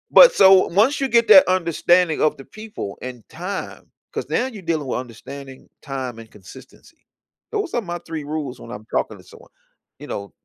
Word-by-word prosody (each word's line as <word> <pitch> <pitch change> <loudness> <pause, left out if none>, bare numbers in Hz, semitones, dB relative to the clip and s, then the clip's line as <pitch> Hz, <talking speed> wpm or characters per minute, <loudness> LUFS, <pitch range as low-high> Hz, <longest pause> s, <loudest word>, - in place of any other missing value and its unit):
But, - - +10
so, 190 -1 +6
once 225 +11 +2
you 270 - +1
get 235 -1 +3
that 285 - +9
understanding 175 -2 +2
of 155 - +2
the 135 - -12
people 215 - -8
and 125 -3 -9
time, 185 +4 -7 0.2
'cause - - -5
now 250 - 0
you're 225 -6 -8
dealing 165 -4 -2
with 125 - -2
understanding 130 +2 -10
time 130 -5 -6
and 115 - -12
consistency, 100 -3 -16 0.5
those 415 -4 -3
are 240 - 0
my 175 -4 -5
3 160 -2 -5
rules 145 -3 -5
when 115 - -12
I'm 105 -2 -9
talking - - -1
to - - -17
someone, - - -17 0.5
you - - -9
know- 100 -2 -6
160 Hz, 190 wpm, -21 LUFS, 130-200 Hz, 0.5 s, But